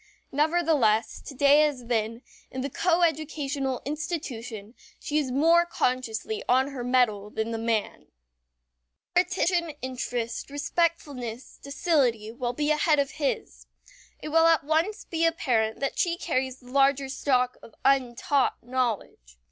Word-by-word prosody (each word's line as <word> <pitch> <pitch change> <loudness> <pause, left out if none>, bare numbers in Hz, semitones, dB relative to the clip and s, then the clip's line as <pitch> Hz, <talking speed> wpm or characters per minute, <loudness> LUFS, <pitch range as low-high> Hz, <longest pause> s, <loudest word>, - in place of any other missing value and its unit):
Nevertheless, 295 -8 +2
to 280 - -8
day 285 +3 +5
as 285 -5 0
then, 230 0 -1 0.3
in 260 - -5
the 275 +1 -4
coeducational 305 -6 0
institution 250 - -5 0.3
she 300 +1 -1
is 280 -4 -2
more 330 +6 +5
consciously 255 - -2
on 260 +2 +3
her 265 -3 -6
mettle 240 -5 +1
than 220 +2 -3
the 225 - -3
man. 225 -2 -2 1.1
Her 355 - +7
attention, 355 -3 0
interest, 245 -2 -3
respectfulness, 285 -5 -2
docility, 275 - 0
will 240 0 -3
be 295 +3 0
ahead 305 0 +3
of 280 -1 0
his. 285 -3 -3 0.5
It - - -6
will 325 +1 +5
at 330 -1 +4
once 320 +8 0
be 330 -1 -2
apparent 240 -10 +1
that 275 - -2
she 340 -1 +1
carries 260 -6 -2
the 250 -1 -15
larger 275 0 +3
stock 255 -2 0
of 225 - -15
untaught 270 0 +2
knowledge. 230 - -3
275 Hz, 135 wpm, -26 LUFS, 240-310 Hz, 1.1 s, Her